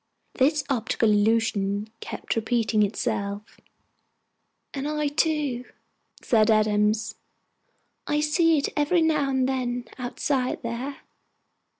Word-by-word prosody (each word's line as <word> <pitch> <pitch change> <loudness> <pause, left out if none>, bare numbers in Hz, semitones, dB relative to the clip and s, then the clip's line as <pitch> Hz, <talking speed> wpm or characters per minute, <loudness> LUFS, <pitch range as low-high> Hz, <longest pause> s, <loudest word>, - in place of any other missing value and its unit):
This 290 +2 +2
optical 230 -4 +1
illusion 210 -1 +1
kept - - -4
repeating 225 -1 +1
itself. 205 -1 -2 1.1
"And 275 0 -3
I 300 -1 -1
too," 295 -5 0 0.6
said 220 -3 +3
Adams. 215 0 +2 0.9
"I 295 - +1
see 320 +2 +3
it 280 - 0
every 310 +3 +2
now 300 -3 +2
and 260 -1 +1
then, 245 -2 -2
outside 255 +1 -2
there. 245 +4 -5
245 Hz, 100 wpm, -25 LUFS, 220-290 Hz, 1.1 s, said